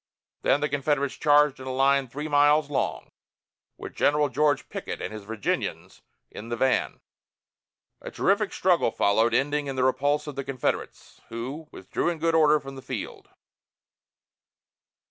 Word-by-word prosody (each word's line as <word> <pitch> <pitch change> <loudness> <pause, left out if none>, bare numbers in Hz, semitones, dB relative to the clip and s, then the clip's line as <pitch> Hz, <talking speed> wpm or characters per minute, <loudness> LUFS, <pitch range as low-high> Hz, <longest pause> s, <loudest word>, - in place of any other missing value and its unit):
Then 140 - +2
the 150 - +1
Confederates 140 0 0
charged 150 -2 +3
in 130 - -8
a - - -2
line 135 +1 +2
three 145 +6 -6
miles 145 0 +3
long, 135 - -2 0.7
with - - -8
General 150 0 +2
George 145 0 +1
Pickett - - -6
and - - -5
his 105 -2 -8
Virginians 110 -1 -3 0.3
in 115 - -9
the 120 - -2
van. 130 +1 0 1.0
A - - -7
terrific - - +1
struggle - - +2
followed, 110 +3 +2
ending 145 +1 0
in 135 - -4
the 130 - 0
repulse 145 +3 +1
of 150 -2 -7
the 140 - -3
Confederates, 130 -2 -4
who 130 +7 -6
withdrew - - -3
in 170 - -3
good 165 +1 0
order 155 -2 +5
from 135 -1 -10
the 135 - -9
field. - - -7
140 Hz, 155 wpm, -26 LUFS, 130-150 Hz, 1.0 s, order